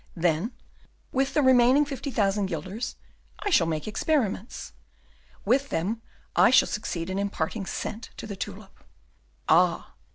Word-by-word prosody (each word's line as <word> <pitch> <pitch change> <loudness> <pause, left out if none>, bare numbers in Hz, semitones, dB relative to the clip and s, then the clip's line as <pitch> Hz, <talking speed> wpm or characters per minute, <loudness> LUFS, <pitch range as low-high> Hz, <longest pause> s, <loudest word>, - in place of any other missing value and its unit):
Then, 175 +6 0 0.6
with 270 +1 0
the 295 - +4
remaining 260 +2 +6
fifty 275 -1 -5
thousand 205 -5 +1
guilders, 185 +7 -4 0.4
I 410 0 -3
shall 170 - +4
make 155 +1 -2
experiments. 225 -2 -1 0.7
With 265 +6 +2
them 210 +8 -1 0.3
I - - +6
shall 260 - +6
succeed 175 -6 -3
in 190 - -1
imparting 195 0 -2
scent 225 +4 -5
to - - -6
the 205 -2 -6
tulip. 195 +1 -8 0.6
Ah! - - +3
215 Hz, 135 wpm, -27 LUFS, 190-260 Hz, 0.7 s, remaining